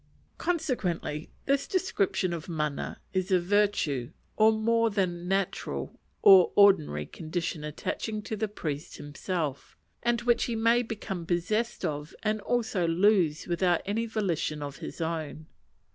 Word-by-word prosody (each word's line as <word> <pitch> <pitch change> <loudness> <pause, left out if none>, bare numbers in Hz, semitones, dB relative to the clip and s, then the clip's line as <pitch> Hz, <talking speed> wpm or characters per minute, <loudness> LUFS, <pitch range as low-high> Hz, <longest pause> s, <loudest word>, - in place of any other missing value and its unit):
Consequently, 215 - -2 0.2
this 280 0 +1
description 200 - 0
of 165 0 -6
mana 150 -3 -3
is 185 -1 0
a 185 -2 +4
virtue, 175 -9 +1 0.2
or 220 0 +6
more 230 +1 +2
than 180 -4 -1
natural 195 0 -2 0.2
or 190 -3 +8
ordinary 160 - +5
condition 165 - -4
attaching 210 +8 -4
to 220 - -4
the 215 +1 -1
priest 150 -8 -5
himself; 145 -1 -4 0.2
and 240 0 +1
which 240 -1 +3
he 235 - -2
may 230 +2 +3
become 210 -6 -5
possessed 185 +7 -1
of 150 0 -4
and 215 0 0
also 220 -7 0
lose 175 -3 +3
without 175 0 +1
any 225 +4 -1
volition 175 -9 -1
of 140 -1 -6
his - - -7
own. 160 -2 -3
185 Hz, 135 wpm, -28 LUFS, 160-220 Hz, 0.2 s, or